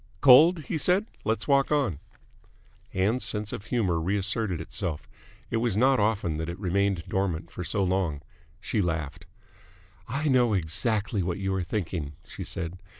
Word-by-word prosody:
"Cold?" 155 +5 +7
he 160 +2 -3
said. 185 +7 +3 0.2
"Let's 110 -1 -1
walk 140 0 +3
on." 135 - +1 0.9
Ann's 105 +7 +1
sense 105 -1 -2
of 100 - -6
humour 100 -9 0
reasserted 100 +1 0
itself. 80 -1 -4 0.4
It 115 - +1
was 115 -3 0
not 130 +3 +4
often 100 -7 0
that 80 +1 -3
it 85 - -5
remained 100 -2 0
dormant 90 -3 -2
for 90 - -6
so 100 +4 -1
long. 90 -6 -1 0.4
She 105 - -1
laughed. 80 -1 -3 0.8
"I 140 +6 -2
know 125 -5 +3
exactly 100 +5 0
what 85 0 -2
you 95 -1 -2
are 95 - 0
thinking," 85 -6 -3
she - - -8
said. 85 +2 -5
100 Hz, 155 wpm, -27 LUFS, 85-115 Hz, 0.9 s, Cold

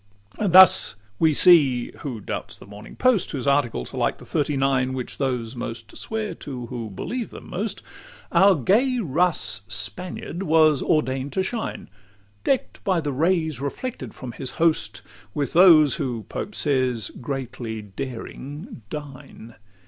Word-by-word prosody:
LIII 215 - 0
And 180 - 0
thus 185 - +9 0.2
we 160 - +4
see 145 -7 +5
who 130 -7 -5
doubts - - -6
the - - -14
Morning 105 +2 -12
Post? 255 -7 +2
(Whose 135 -3 -3
articles 140 - 0
are - - -6
like - - 0
the - - -14
"Thirty 145 -1 -1
nine," 135 -1 +1
Which 130 -2 -5
those 125 -3 -2
most 115 -2 -7
swear 220 -1 -4
to 125 -4 -7
who 115 -2 -6
believe 235 - -5
them - - -12
most) 200 +2 -4 0.5
Our 190 +2 +5
gay 230 - +2
Russ 170 - 0
Spaniard 175 - -5
was 155 -5 +4
ordain'd 135 -3 0
to 190 - 0
shine, 225 +3 -5 0.6
Deck'd 270 - -1
by 185 -3 +1
the 145 -3 -3
rays 160 -2 0
reflected 235 - -5
from 130 -2 -7
his 130 +2 -4
host, 105 - +1 0.3
With 140 -4 -2
those 160 -5 +6
who, 120 -6 -4
Pope 210 - -5
says, 130 -7 0
"greatly 120 -4 -5
daring 135 - -8
dine." 135 -5 -9
140 Hz, 150 wpm, -23 LUFS, 125-180 Hz, 0.6 s, thus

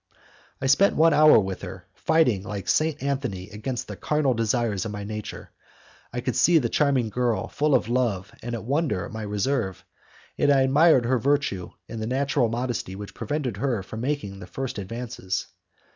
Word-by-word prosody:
I - - -4
spent 140 +10 +4
one 165 0 +5
hour 155 0 +7
with 95 -3 -1
her, - - -8
fighting 155 -11 +2
like 100 -1 -6
Saint 155 -2 +1
Anthony 125 -9 -3
against 115 +4 -4
the - - -6
carnal 150 -3 +1
desires 115 -3 0
of 110 - -4
my 105 0 -5
nature. 105 0 -7 0.6
I 125 - -3
could 125 - -2
see 175 -1 +5
the 125 -7 +1
charming 135 -6 +2
girl 120 -1 0
full 150 -1 +1
of 125 - +1
love 115 -6 0
and 120 0 -4
of 110 - -6
wonder 135 - 0
at - - -9
my 110 - -5
reserve, 105 -1 -2 0.5
and 145 - +4
I 135 -1 +5
admired 135 -1 +5
her 125 +1 +2
virtue 140 -9 0
in 115 - -6
the 110 - -3
natural 135 -1 +1
modesty 120 -5 -3
which 100 +1 -8
prevented 145 -8 -3
her 120 -5 -1
from 110 +4 -7
making 120 -8 -3
the - - -9
first 135 -5 -4
advances. 115 -1 -4
120 Hz, 185 wpm, -25 LUFS, 105-140 Hz, 0.6 s, hour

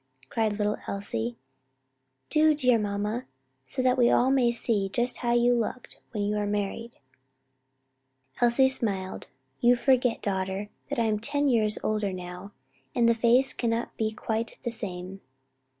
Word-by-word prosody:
cried 220 -2 0
little 210 0 0
Elsie; 120 - -3 0.9
"do, 310 0 +5
dear 250 -5 +3
mamma, 210 +3 -2 0.4
so 255 - -2
that 255 0 +3
we 245 - +6
may - - +4
all 255 -1 +4
see 220 -4 -1
just 240 +5 -1
how 240 -1 -1
you 240 0 +4
looked 240 +1 -3
when 210 -2 -3
you 205 +1 0
were 210 -1 -1
married." 210 +3 -3 1.5
Elsie 240 +2 +5
smiled, 200 -8 -3 0.3
"You 245 +1 +5
forget, 250 -1 +2
daughter, 190 +1 -2 0.2
that - - -3
I 235 - +2
am 215 -1 +1
ten 285 +5 +1
years 215 -5 +2
older 215 -2 0
now, 180 +2 -7 0.4
and 235 - +4
the 235 - +5
face 240 +3 +3
cannot 230 0 -2
be 220 -1 0
quite 220 +1 -3
the 235 - -2
same." 195 -3 -7
225 Hz, 150 wpm, -27 LUFS, 205-245 Hz, 1.5 s, we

